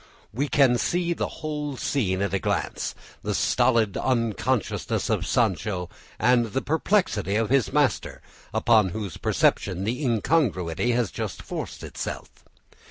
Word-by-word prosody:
We 140 Hz, +6 st, 0 dB
can 130 Hz, -4 st, +4 dB
see 175 Hz, 0 st, 0 dB
the -, -, -2 dB
whole 150 Hz, -3 st, -4 dB
scene 100 Hz, -7 st, 0 dB
at 100 Hz, -, -2 dB
a 100 Hz, -, +2 dB
glance, -, -, -2 dB, 0.3 s
the -, -, -2 dB
stolid 115 Hz, -6 st, +2 dB
unconsciousness 120 Hz, -1 st, 0 dB
of -, -, 0 dB
Sancho 90 Hz, -5 st, 0 dB, 0.3 s
and 120 Hz, -2 st, +3 dB
the 135 Hz, -, 0 dB
perplexity 160 Hz, -, +1 dB
of 110 Hz, +1 st, 0 dB
his 135 Hz, -3 st, +3 dB
master, 145 Hz, -8 st, 0 dB, 0.3 s
upon 110 Hz, -2 st, +4 dB
whose 100 Hz, -6 st, -5 dB
perception 95 Hz, +1 st, +1 dB
the 120 Hz, +8 st, -2 dB
incongruity 115 Hz, -, +1 dB
has 120 Hz, -6 st, 0 dB
just -, -, -5 dB
forced -, -, -6 dB
itself. -, -, -5 dB
120 Hz, 135 wpm, -25 LUFS, 100-140 Hz, 0.3 s, can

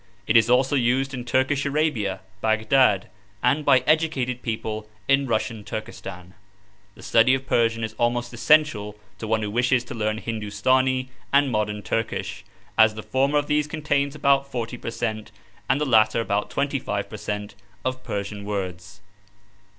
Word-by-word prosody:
It 110 Hz, -, +1 dB
is 115 Hz, 0 st, +6 dB
also 130 Hz, +3 st, +3 dB
used 130 Hz, +2 st, +1 dB
in 125 Hz, -2 st, -5 dB
Turkish 130 Hz, +3 st, +1 dB
Arabia 140 Hz, -10 st, 0 dB, 0.2 s
(Baghdad), 110 Hz, -1 st, +3 dB, 0.4 s
and 140 Hz, +5 st, +2 dB
by 130 Hz, -3 st, +5 dB
educated 150 Hz, -6 st, +1 dB
people 110 Hz, -2 st, -4 dB, 0.2 s
in 135 Hz, 0 st, +3 dB
Russian 110 Hz, -1 st, -1 dB
Turkestan. 95 Hz, -4 st, -7 dB, 0.6 s
The -, -, -14 dB
study 115 Hz, +3 st, +4 dB
of 130 Hz, 0 st, -5 dB
Persian 115 Hz, -2 st, +1 dB
is 110 Hz, 0 st, -3 dB
almost 120 Hz, +1 st, 0 dB
essential 120 Hz, -5 st, +2 dB, 0.2 s
to 110 Hz, -, -5 dB
one 110 Hz, 0 st, +1 dB
who 105 Hz, -, -3 dB
wishes 125 Hz, +2 st, +2 dB
to 120 Hz, -, -8 dB
learn 110 Hz, -2 st, -1 dB
Hindustani 130 Hz, +4 st, 0 dB, 0.2 s
and 140 Hz, -1 st, +3 dB
modern 105 Hz, -1 st, -1 dB
Turkish, 95 Hz, -4 st, -3 dB, 0.4 s
as 110 Hz, -1 st, +6 dB
the 110 Hz, -, -7 dB
former 135 Hz, +3 st, +1 dB
of 145 Hz, -, +1 dB
these 150 Hz, 0 st, +1 dB
contains 145 Hz, -2 st, -1 dB
about 140 Hz, -1 st, +2 dB
40 120 Hz, 0 st, -4 dB
per -, -, -5 dB
cent, 110 Hz, -2 st, -4 dB, 0.4 s
and 135 Hz, -, +3 dB
the 150 Hz, -, 0 dB
latter 110 Hz, -3 st, +4 dB
about 105 Hz, -2 st, -1 dB
25 135 Hz, -8 st, -2 dB
per 110 Hz, -, -8 dB
cent, 105 Hz, 0 st, -4 dB, 0.3 s
of 130 Hz, 0 st, -2 dB
Persian 100 Hz, 0 st, -4 dB
words. 95 Hz, -3 st, -5 dB
120 Hz, 160 wpm, -24 LUFS, 110-135 Hz, 0.6 s, is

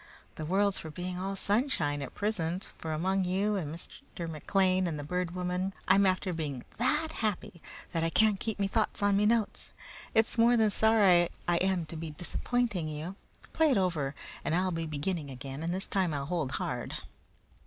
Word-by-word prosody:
The 155 Hz, -, -5 dB
world's 200 Hz, +2 st, +2 dB
for 160 Hz, -, -7 dB
being 180 Hz, +3 st, -5 dB
all 195 Hz, +1 st, -2 dB
sunshine 200 Hz, -, +1 dB
at 135 Hz, -, -7 dB
prisint, 190 Hz, -4 st, -1 dB
for 160 Hz, -, -5 dB
among 190 Hz, +5 st, +1 dB
you 195 Hz, +3 st, +1 dB
and 160 Hz, -7 st, -2 dB
Mr. 170 Hz, +1 st, -7 dB
McLean 185 Hz, +3 st, +1 dB
and 160 Hz, -3 st, -2 dB
the 145 Hz, -, -5 dB
Bird 180 Hz, +3 st, -2 dB
Woman 180 Hz, +1 st, -2 dB
I'm 195 Hz, +1 st, +6 dB
after 185 Hz, 0 st, +1 dB
being 145 Hz, -6 st, -3 dB, 0.2 s
THAT 300 Hz, +6 st, +2 dB
happy 210 Hz, -, -3 dB, 0.3 s
that 165 Hz, -1 st, 0 dB
I 165 Hz, -, +2 dB
can't 215 Hz, +2 st, +3 dB
keep 220 Hz, -3 st, -3 dB
me 200 Hz, -1 st, +1 dB
thoughts 215 Hz, 0 st, 0 dB
on 205 Hz, -1 st, +4 dB
me 210 Hz, +1 st, +4 dB
notes. 225 Hz, -2 st, +1 dB, 0.5 s
It's 225 Hz, +1 st, +3 dB
more 235 Hz, +1 st, +6 dB
than 220 Hz, -2 st, +4 dB
sorry 200 Hz, -6 st, +5 dB, 0.2 s
I 175 Hz, 0 st, +3 dB
am 185 Hz, -2 st, +1 dB
to 160 Hz, -, -7 dB
be 160 Hz, 0 st, -5 dB
disappointing 185 Hz, +3 st, -1 dB
you. 155 Hz, +5 st, -5 dB, 0.4 s
Play 320 Hz, -1 st, +4 dB
it 260 Hz, -, +3 dB
over, 160 Hz, -7 st, 0 dB, 0.3 s
and 160 Hz, -, 0 dB
I'll 185 Hz, +1 st, +1 dB
be 165 Hz, -1 st, -2 dB
beginning 155 Hz, +1 st, -2 dB
again, 135 Hz, +2 st, -7 dB
and 165 Hz, +1 st, -1 dB
this 190 Hz, +2 st, -1 dB
time 185 Hz, -6 st, 0 dB
I'll 140 Hz, -1 st, -2 dB
hold 160 Hz, -4 st, -2 dB
hard." -, -, -3 dB
185 Hz, 190 wpm, -30 LUFS, 160-200 Hz, 0.5 s, I'm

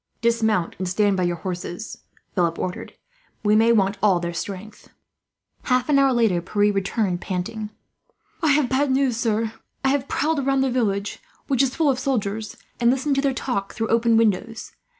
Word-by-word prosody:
"Dismount 220 Hz, -6 st, +1 dB
and 185 Hz, -1 st, -2 dB
stand 200 Hz, +1 st, +2 dB
by 185 Hz, -, -1 dB
your 175 Hz, 0 st, 0 dB
horses," 180 Hz, +3 st, -6 dB, 0.3 s
Philip 170 Hz, -3 st, +1 dB
ordered. 180 Hz, -, -5 dB, 0.5 s
"We 210 Hz, 0 st, +4 dB
may 225 Hz, +2 st, +5 dB
want 200 Hz, -2 st, +2 dB
all 195 Hz, -4 st, +4 dB
their 170 Hz, 0 st, -4 dB
strength." 200 Hz, +4 st, -7 dB, 0.8 s
Half 250 Hz, +1 st, +1 dB
an 280 Hz, -2 st, +5 dB
hour 275 Hz, -1 st, +4 dB
later 225 Hz, -8 st, +2 dB
Pierre 205 Hz, +3 st, +1 dB
returned, 195 Hz, -2 st, -1 dB
panting. 210 Hz, +4 st, -4 dB, 0.7 s
"I 320 Hz, -, +2 dB
have 290 Hz, -2 st, +3 dB
bad 275 Hz, +3 st, +1 dB
news, 260 Hz, -3 st, +1 dB
sir. 225 Hz, -1 st, 0 dB, 0.3 s
I 265 Hz, -, +3 dB
have 280 Hz, 0 st, 0 dB
prowled 310 Hz, +1 st, 0 dB
about 270 Hz, 0 st, +1 dB
the 265 Hz, -1 st, +1 dB
village, 205 Hz, -5 st, -1 dB, 0.3 s
which 270 Hz, -3 st, +1 dB
is 265 Hz, -2 st, +1 dB
full 315 Hz, -4 st, +3 dB
of 255 Hz, -, -2 dB
soldiers, 220 Hz, -5 st, -2 dB, 0.2 s
and 235 Hz, -1 st, +4 dB
listened 270 Hz, +3 st, +1 dB
to -, -, +3 dB
their 275 Hz, -1 st, +1 dB
talk 245 Hz, -6 st, -3 dB
through 225 Hz, -1 st, -2 dB
open 230 Hz, 0 st, +3 dB
windows. 225 Hz, +1 st, 0 dB
225 Hz, 180 wpm, -23 LUFS, 195-260 Hz, 0.8 s, may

